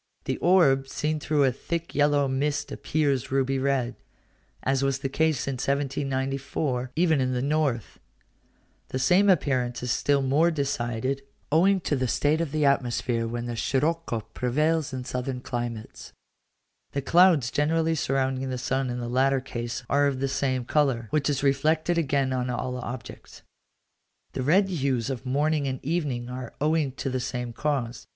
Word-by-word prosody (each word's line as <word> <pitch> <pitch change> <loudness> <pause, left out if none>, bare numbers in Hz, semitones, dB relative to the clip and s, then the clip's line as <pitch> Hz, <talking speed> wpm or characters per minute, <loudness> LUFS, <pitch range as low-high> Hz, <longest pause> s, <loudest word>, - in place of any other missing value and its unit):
The - - -2
orb 150 -7 +4
seen 155 +3 -2
through 150 -1 +1
a 130 - +4
thick 170 +6 -4
yellow 145 -1 +3
mist 140 +2 -1
appears 140 -6 -1
ruby 135 0 +1
red 130 -2 0 0.7
(as 135 0 +1
was 135 -1 +1
the 135 0 -3
case 155 0 +1
in 135 - -1
1794, 135 -1 -1
even 160 -3 +3
in 130 0 0
the 125 - -1
north); 140 -6 -1 0.9
the - - -3
same 180 +10 +4
appearance 130 -8 +1
is 125 - -1
still 140 +1 +2
more 145 +6 +3
decided, 135 -3 -2 0.3
owing 185 +5 +4
to 150 - 0
the 130 -1 0
state 150 +6 +1
of 165 -4 -2
the 155 -1 +1
atmosphere, 120 -3 +1
when 120 +1 -4
the 120 -1 -4
scirocco 140 0 0
prevails 150 +4 0
in 130 -1 -4
southern 125 +1 -3
climates: 120 -3 -6 0.8
the 140 - -1
clouds 165 -5 +5
generally 160 +2 +1
surrounding 135 -3 -1
the 130 - -2
sun 130 +1 -1
in 120 - -3
the 120 - -4
latter 135 +2 +2
case 120 -2 -5
are 145 +1 +3
of 135 -2 -1
the 135 - 0
same 130 -2 -1
colour, 130 -4 +1
which 150 -2 +1
is 140 -1 -1
reflected 155 +5 +2
again 140 -3 +1
on 125 0 -1
all 125 +1 -2
objects. 120 -1 -8 0.9
The - - -3
red 180 +9 +4
hues 135 - -1
of 130 0 -6
morning 145 +2 +1
and 130 -1 -3
evening 140 -7 -1
are 125 -1 -7
owing 150 -2 +1
to 135 0 -4
the 130 - -1
same 125 -1 -4
cause. 125 -4 -2
135 Hz, 165 wpm, -26 LUFS, 125-150 Hz, 0.9 s, clouds